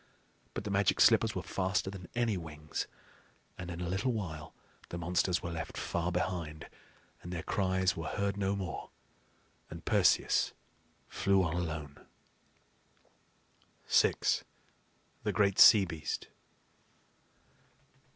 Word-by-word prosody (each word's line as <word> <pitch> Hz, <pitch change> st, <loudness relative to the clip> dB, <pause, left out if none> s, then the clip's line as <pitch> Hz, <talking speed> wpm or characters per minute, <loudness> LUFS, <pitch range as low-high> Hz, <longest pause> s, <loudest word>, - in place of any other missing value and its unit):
But -, -, -3 dB
the 105 Hz, -, -4 dB
Magic 100 Hz, -1 st, +2 dB
Slippers -, -, +5 dB
were -, -, -3 dB
faster 95 Hz, 0 st, -1 dB
than 95 Hz, -3 st, -9 dB
any 115 Hz, -3 st, +1 dB
wings, 75 Hz, -3 st, -5 dB, 0.7 s
and 90 Hz, -1 st, -7 dB
in 85 Hz, -1 st, -6 dB
a 90 Hz, -, -2 dB
little 95 Hz, +9 st, 0 dB
while 85 Hz, -9 st, -5 dB, 0.3 s
the 85 Hz, -, -5 dB
monsters 85 Hz, +1 st, 0 dB
were 85 Hz, -, -3 dB
left 80 Hz, -1 st, -5 dB
far 85 Hz, +1 st, -2 dB
behind, 85 Hz, -3 st, -3 dB, 0.5 s
and 90 Hz, -, -8 dB
their 85 Hz, -1 st, -4 dB
cries 95 Hz, -1 st, +1 dB
were 80 Hz, -, -5 dB
heard 100 Hz, -1 st, -1 dB
no 100 Hz, 0 st, 0 dB
more; 95 Hz, -2 st, -5 dB, 0.8 s
and -, -, -9 dB
Perseus -, -, +3 dB, 0.5 s
flew 95 Hz, -1 st, +2 dB
on 80 Hz, -2 st, -1 dB
alone. 80 Hz, -4 st, -4 dB, 1.8 s
VI. -, -, +5 dB, 1.1 s
THE 105 Hz, -, -1 dB
GREAT 100 Hz, 0 st, +2 dB
SEA 105 Hz, -3 st, +9 dB
BEAST. 80 Hz, -3 st, -5 dB
90 Hz, 120 wpm, -32 LUFS, 85-100 Hz, 1.8 s, SEA